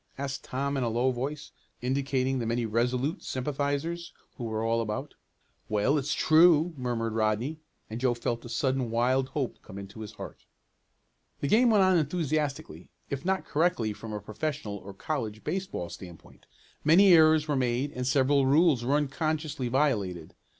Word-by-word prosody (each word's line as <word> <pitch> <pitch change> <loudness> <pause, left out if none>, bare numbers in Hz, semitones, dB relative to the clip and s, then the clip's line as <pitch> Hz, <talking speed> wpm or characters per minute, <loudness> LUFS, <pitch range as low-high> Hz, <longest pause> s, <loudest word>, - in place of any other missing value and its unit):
asked 140 0 -4
Tom 140 +2 -2
in - - 0
a 120 - 0
low 120 +3 +1
voice, 140 +4 -5 0.3
indicating 130 0 0
the 115 - -2
many 115 +1 0
Resolute 125 - 0
sympathizers 145 +5 -2 0.2
who 120 - -6
were 110 -1 -2
all 115 0 +1
about. 115 +6 -4 0.6
"Well, 110 +8 +2
it's 140 +2 -2
true," 160 +1 +5
murmured 120 -4 -2
Rodney, 110 +8 0 0.3
and 110 +2 -6
Joe 125 -2 +2
felt 120 0 -3
a 120 - -9
sudden 130 -1 0
wild 130 +3 +1
hope 135 -4 -3
come 95 - -11
into 100 +2 -9
his 110 -2 -7
heart. - - -10 0.9
The 140 - -1
game 235 - +5
went 210 -3 +5
on 185 -2 +4
enthusiastically, 155 -1 -2 0.2
if 135 -1 -3
not 190 +1 0
correctly 150 -9 +1
from 110 +1 -9
a 105 - -3
professional 110 +1 -4
or 100 0 -11
college 110 -4 -4
baseball 185 - -3
standpoint. 90 -4 -12 0.4
Many 180 +5 +7
errors 155 -1 +5
were 150 - 0
made 130 +2 0
and 125 -2 -4
several 135 +1 +3
rules 145 -3 +4
were 135 +4 +1
unconsciously 150 -1 -1
violated. 105 - 0
135 Hz, 165 wpm, -28 LUFS, 115-150 Hz, 0.9 s, Many